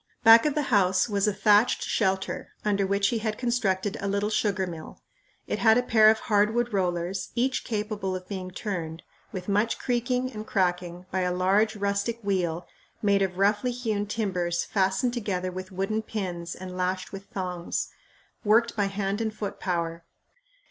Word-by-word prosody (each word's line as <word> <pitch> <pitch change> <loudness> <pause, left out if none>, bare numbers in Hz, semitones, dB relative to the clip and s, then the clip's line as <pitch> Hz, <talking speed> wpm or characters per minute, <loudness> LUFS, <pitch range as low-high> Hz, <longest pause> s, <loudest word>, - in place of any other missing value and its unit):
Back 225 +4 +8
of 295 - -1
the 300 - +1
house 185 -1 +4
was 200 -2 +1
a - - +3
thatched 210 +3 +4
shelter 190 -3 -1
under 200 -2 +1
which 200 +1 +2
he 230 - 0
had 215 -1 -2
constructed 205 -6 0
a 200 - -2
little 200 +2 0
sugar 200 -3 +1
mill. 165 -3 -8 0.5
It - - -2
had 225 0 +5
a 245 - +2
pair 220 -3 +6
of 220 0 +2
hardwood 220 +2 +1
rollers, 180 -1 -1
each 255 +2 0
capable 210 -4 -2
of 185 0 -7
being 185 -2 -5
turned, 175 -4 -5 0.3
with 185 -3 -6
much 210 +3 +1
creaking 250 +1 -1
and 215 -1 -7
cracking, 180 -2 -1
by 190 - 0
a 180 -1 +1
large, 195 +5 +2
rustic 200 +3 -1
wheel 180 -4 -1 0.4
made 200 -1 +3
of 185 -2 -1
roughly 205 +5 +2
hewn 225 -4 -2
timbers 180 -6 -1
fastened 195 +5 +1
together 185 -6 -2
with 185 +1 -7
wooden 195 +4 -1
pins 180 -6 -4
and 185 0 -8
lashed 185 +1 -2
with 195 0 -8
thongs, 180 -3 -3 0.5
worked 230 +3 +3
by 205 -2 +1
hand 195 +1 -2
and 220 -1 -2
foot 205 -1 -5
power. 170 -2 -2
200 Hz, 170 wpm, -27 LUFS, 185-220 Hz, 0.5 s, Back